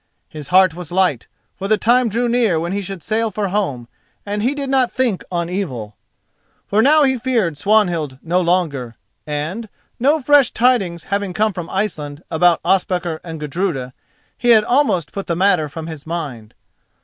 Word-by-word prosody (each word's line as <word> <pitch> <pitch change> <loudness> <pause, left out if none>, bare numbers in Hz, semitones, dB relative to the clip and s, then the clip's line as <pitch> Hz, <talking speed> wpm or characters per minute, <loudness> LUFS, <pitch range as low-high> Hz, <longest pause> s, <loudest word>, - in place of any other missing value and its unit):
His 150 -2 -9
heart 185 +2 +5
was 175 -1 -8
light, 180 -8 +1 0.3
for 195 - -5
the 215 +1 +3
time 240 +3 +3
drew 235 +3 0
near 230 -8 +2
when 170 +2 -3
he 200 +1 -1
should 195 -2 -7
sail 225 +1 0
for 205 -1 -2
home, 160 - -2 0.4
and 205 0 -2
he 255 +6 0
did 280 -1 -4
not 265 -2 +2
think 245 -7 0
on 170 -1 -1
evil. 130 - -4 0.7
For 210 +2 +2
now 300 +5 +5
he 265 -2 +2
feared 225 - 0
Swanhild 175 -7 +1
no 175 +2 +1
longer, 160 -10 -1 0.3
and, 160 +10 -4 0.3
no 285 +6 +3
fresh 290 -1 +4
tidings 200 -9 +1
having 200 -2 -2
come 215 +2 +1
from 175 -3 -6
Iceland 160 -7 -3
about 170 +1 +3
Ospakar 180 -4 0
and 165 -2 -7
Gudruda, 150 -4 -3 0.4
he 245 - -1
had 220 -2 +7
almost 240 - +1
put 195 - -6
the 170 - 0
matter 180 -4 +2
from 160 +2 -7
his 160 -2 -8
mind. 140 -10 -5
185 Hz, 175 wpm, -19 LUFS, 160-220 Hz, 0.7 s, had